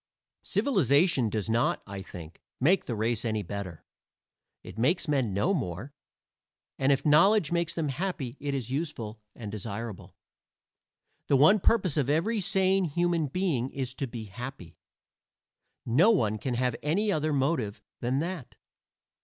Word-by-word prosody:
Civilization 150 Hz, -, +2 dB
does 105 Hz, -1 st, -2 dB
not, 115 Hz, +1 st, +1 dB
I 100 Hz, -1 st, -7 dB
think, 85 Hz, -3 st, -11 dB, 0.2 s
make 175 Hz, +9 st, +3 dB
the 120 Hz, -, -3 dB
race 110 Hz, +1 st, 0 dB
any 110 Hz, -3 st, -1 dB
better. 95 Hz, -3 st, -7 dB, 0.8 s
It -, -, -9 dB
makes 165 Hz, +8 st, +2 dB
men 135 Hz, -7 st, +1 dB
know 100 Hz, -, +1 dB
more: 115 Hz, -, -4 dB, 0.9 s
and 135 Hz, +1 st, +3 dB
if 135 Hz, 0 st, +1 dB
knowledge 170 Hz, +3 st, +5 dB
makes 170 Hz, -1 st, 0 dB
them 160 Hz, -3 st, -1 dB
happy 145 Hz, -4 st, -3 dB
it 140 Hz, -1 st, -2 dB
is 125 Hz, -2 st, -3 dB
useful 120 Hz, -8 st, -4 dB
and 110 Hz, -4 st, -7 dB
desirable. 105 Hz, 0 st, -6 dB, 1.1 s
The 140 Hz, -, +3 dB
one 160 Hz, +10 st, +6 dB
purpose 190 Hz, -6 st, +2 dB
of 140 Hz, -2 st, +1 dB
every 200 Hz, +9 st, +1 dB
sane 190 Hz, 0 st, +2 dB
human 170 Hz, 0 st, 0 dB
being 140 Hz, -6 st, -1 dB
is 130 Hz, -2 st, -4 dB
to 135 Hz, 0 st, -4 dB
be 115 Hz, -1 st, -7 dB
happy. 105 Hz, -4 st, -9 dB, 1.1 s
No 145 Hz, -, +4 dB
one 110 Hz, -, +2 dB
can 125 Hz, 0 st, -2 dB
have 125 Hz, 0 st, 0 dB
any 200 Hz, +8 st, +1 dB
other 155 Hz, -3 st, 0 dB
motive 135 Hz, -7 st, 0 dB, 0.2 s
than 125 Hz, +2 st, -1 dB
that. 170 Hz, -5 st, -5 dB
135 Hz, 145 wpm, -28 LUFS, 115-170 Hz, 1.1 s, one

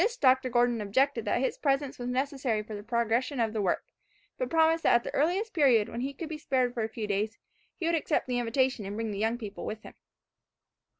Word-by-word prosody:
To -, -, +5 dB
this 470 Hz, +2 st, -2 dB
Dr. 260 Hz, -, +4 dB
Gordon 240 Hz, -1 st, +2 dB
objected 235 Hz, +4 st, +1 dB
that 240 Hz, -, +1 dB
his 265 Hz, -, -1 dB
presence 275 Hz, -2 st, 0 dB
was 245 Hz, -, -4 dB
necessary 255 Hz, -4 st, -1 dB
for 215 Hz, -, -9 dB
the 205 Hz, -, -5 dB
progression 235 Hz, +4 st, 0 dB
of 225 Hz, -2 st, +1 dB
the 215 Hz, -, -1 dB
work, 185 Hz, -3 st, 0 dB, 0.5 s
but -, -, -1 dB
promised 325 Hz, 0 st, +3 dB
that -, -, +4 dB
at 235 Hz, -, +3 dB
the -, -, -6 dB
earliest 380 Hz, +9 st, +1 dB
period 255 Hz, -, +4 dB
when 235 Hz, -, -5 dB
he 270 Hz, +2 st, -2 dB
could 315 Hz, +4 st, -7 dB
be 310 Hz, -1 st, -6 dB
spared 255 Hz, -4 st, 0 dB
for 235 Hz, -, -2 dB
a 220 Hz, -, -1 dB
few 220 Hz, -1 st, -4 dB
days, 210 Hz, +2 st, -1 dB, 0.4 s
he 345 Hz, -, -4 dB
would 335 Hz, -, +2 dB
accept 320 Hz, -1 st, +1 dB
the 250 Hz, -1 st, -1 dB
invitation 245 Hz, 0 st, +1 dB
and 200 Hz, +1 st, -5 dB
bring 225 Hz, 0 st, -2 dB
the 200 Hz, -, -4 dB
young 225 Hz, +2 st, +1 dB
people 210 Hz, -4 st, -7 dB
with 215 Hz, 0 st, -5 dB
him. -, -, -11 dB
245 Hz, 240 wpm, -29 LUFS, 220-280 Hz, 0.5 s, To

